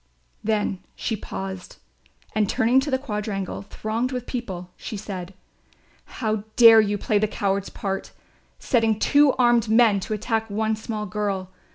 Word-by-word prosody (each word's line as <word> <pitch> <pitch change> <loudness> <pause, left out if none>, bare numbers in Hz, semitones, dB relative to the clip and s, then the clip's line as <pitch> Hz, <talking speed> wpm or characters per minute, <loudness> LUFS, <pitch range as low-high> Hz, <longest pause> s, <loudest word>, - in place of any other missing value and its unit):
Then 210 -3 0 0.2
she 225 - -2
paused 190 -2 -7 0.6
and 210 -2 +1
turning 240 +4 +3
to 280 +2 -2
the 260 - +2
quadrangle 210 -8 -4
thronged 220 +5 -3
with 250 -2 -4
people 185 -8 -5
she 215 - -6
said: 190 -2 -7 0.7
"How 220 -2 -2 0.2
dare 230 -2 +9
you 205 -1 0
play 205 +1 +1
the 215 - +2
cowards' 200 -1 -1
part, 195 -1 -4 0.5
setting 225 -3 +1
two 285 +4 +4
armed 240 -3 +3
men 220 -3 +5
to 215 +3 -3
attack 225 +1 -2
one 220 +2 0
small 215 -1 -4
girl? 195 -2 -3
215 Hz, 150 wpm, -24 LUFS, 200-230 Hz, 0.7 s, dare